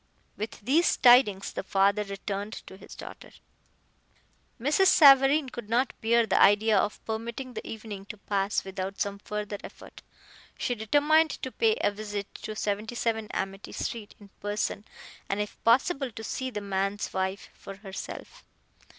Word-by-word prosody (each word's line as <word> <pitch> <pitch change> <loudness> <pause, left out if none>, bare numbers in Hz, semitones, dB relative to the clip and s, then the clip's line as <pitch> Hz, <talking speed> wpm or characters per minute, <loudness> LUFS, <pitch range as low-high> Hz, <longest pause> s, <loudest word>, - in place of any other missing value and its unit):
With 215 +2 -6
these 300 +11 +3
tidings 240 -6 +5
the - - -3
father 200 +2 +2
returned 200 +1 -5
to - - -11
his 190 - -13
daughter. - - -11 1.3
Mrs. 295 +10 +3
Savareen 280 -4 +6
could 240 -4 -8
not 245 +3 +1
bear 235 +1 +3
the 195 - +2
idea 210 +2 +5
of 205 +1 0
permitting 235 +3 -5
the - - -7
evening 210 -3 -7
to 215 - -8
pass 200 0 -1
without 190 0 -5
some 200 -1 -2
further 210 0 -5
effort. - - -12 0.6
She 245 - -1
determined 290 +8 +3
to 260 - -3
pay 450 - +2
a - - +2
visit 205 -1 -6
to 215 - -6
77 220 +2 -2
Amity 195 +1 -5
street, 220 -3 -5
in 205 -1 -15
person, 205 0 -2 0.4
and 195 - -1
if 210 0 -5
possible 270 +4 +3
to 225 -1 -9
see 260 +4 -3
the 210 -4 -5
man's 195 +1 -2
wife 190 +1 -3
for 195 - -10
herself. 195 -1 -9
215 Hz, 150 wpm, -28 LUFS, 200-245 Hz, 1.3 s, Savareen